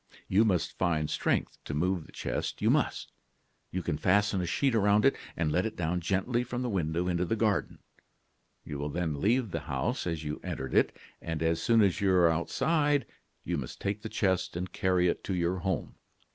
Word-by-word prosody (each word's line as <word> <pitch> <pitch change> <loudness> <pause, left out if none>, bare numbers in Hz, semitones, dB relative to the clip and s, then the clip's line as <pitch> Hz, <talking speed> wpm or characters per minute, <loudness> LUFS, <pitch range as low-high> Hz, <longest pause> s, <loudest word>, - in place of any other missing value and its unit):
You 105 +4 +4
must 90 -6 0
find 80 -4 +1
strength - - -1
to 75 - -4
move 90 +1 0
the - - -15
chest - - -3
you - - +3
must. - - 0 0.6
You 90 0 -3
can 75 -4 -2
fasten 100 0 +2
a 90 - -2
sheet 135 - +1
around 105 0 +4
it 135 - +5 0.2
and 80 -2 +1
let 90 +4 +2
it 110 - -3
down 90 +1 -1
gently 100 +7 0
from 125 +1 -4
the 125 - -2
window 85 -1 0
into 90 0 +1
the 100 +5 0
garden. 110 -2 0 0.9
You 70 - -5
will 75 +1 -2
then 80 -2 -2
leave 115 0 +2
the - - -2
house - - -1
as 80 -2 -2
you 75 0 -4
entered 65 - -4
it, - - +3 0.2
and 80 -1 -3
as 80 0 +1
soon 115 +1 +4
as 100 0 +1
you 100 -1 +3
are 85 -2 +5
outside, 145 - +1 0.4
you 85 -2 -1
must 60 - -7
take 100 +1 -2
the 110 - -5
chest 95 -6 0
and 90 +1 -4
carry 90 -1 +2
it - - -1
to 95 - -1
your 90 +1 0
home. 95 +1 -2
90 Hz, 205 wpm, -30 LUFS, 85-105 Hz, 0.9 s, it